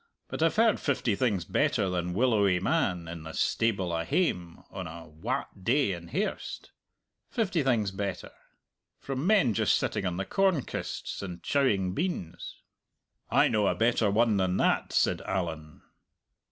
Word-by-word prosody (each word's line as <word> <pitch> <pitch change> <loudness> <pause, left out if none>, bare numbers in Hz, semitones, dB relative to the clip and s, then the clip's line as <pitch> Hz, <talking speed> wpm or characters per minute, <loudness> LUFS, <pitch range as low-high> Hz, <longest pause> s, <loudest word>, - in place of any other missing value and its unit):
But - - -5
I've 165 0 +3
heard 225 0 +4
fifty 130 -6 0
things 100 -8 0
better 100 - +1
than 90 -1 -2
'willowy 105 -6 +3
man' 95 - 0
in 85 0 -7
the 80 0 -8
stable 100 -7 0
a 85 - -1
hame 90 - -1
on 95 -3 -5
a 80 0 -9
wat 80 +4 -5
day 125 0 +2
in 85 -2 -6
hairst - - -4 0.6
fifty 190 -8 0
things 115 -8 +1
better 100 0 -4 0.7
from 135 +4 -3
men 195 - +4
just - - +3
sitting 95 - -1
on 90 -1 -2
the 95 - -2
corn 190 -8 +2
kists - - -5
and 90 -3 -7
chowing 100 -10 +1
beans." 95 - -4 0.7
"I - - +4
know 105 -2 +2
a - - +1
better 115 -1 +2
one 110 +1 +3
than 95 -1 +1
that," - - +1
said - - +2
Allan. 80 -4 -4
100 Hz, 155 wpm, -28 LUFS, 90-130 Hz, 0.7 s, heard